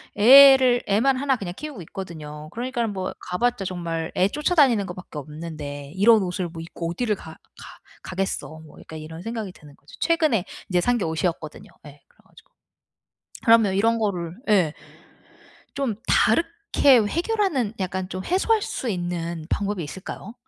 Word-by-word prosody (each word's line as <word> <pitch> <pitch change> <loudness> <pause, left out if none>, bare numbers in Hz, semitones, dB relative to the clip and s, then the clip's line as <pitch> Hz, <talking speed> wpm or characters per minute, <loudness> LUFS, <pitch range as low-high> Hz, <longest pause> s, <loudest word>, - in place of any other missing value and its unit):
애를 260 +1 +8
애만 235 +7 +3
1 270 0 +1
그냥 180 -4 -6
키우고 295 -8 -7
있거든요. 155 -5 -8
그러니까는 240 -1 -2
뭐 185 -1 -4
가 180 0 -5
봤자 245 -2 0
정말 170 -3 -4
애 185 - +4
쫓아다니는 280 - +2
거 175 - -6
밖에 175 -4 -10
없는데 145 -1 -7
'이런 220 +3 +5
옷을 180 0 -3
뭐 165 0 -8
입고 165 0 -6
어디를 210 +3 -1
가 160 - -11
가 - - -15 0.3
가겠어.' 190 +1 -3 0.2
뭐 - - -16
약간 160 - -10
이런 160 +2 -9
생각이 220 -2 -5
드는 145 -2 -16
거죠. 145 - -17
최근에 310 - +2 0.3
이제 180 -2 +2
산 245 +4 +2
게 210 - -2
옷이었거든요. 160 -1 -3 0.2
예, 145 -1 -14
그래 - - -33
가지고. - - -21 0.9
그러면 225 -4 +5
이런 225 +4 +2
거를 180 -6 -2
예 180 -7 +3 1.0
좀 275 -5 -1
다르게 310 - +3
해결하는 330 - 0
약간 185 0 -2
좀 185 - -5
해소할 425 +5 +2
수 255 - -4
있는 170 -3 -4
방법이 205 -3 -1
있을까요? 190 +7 -8
195 Hz, 335 characters per minute, -23 LUFS, 170-245 Hz, 1.0 s, 애를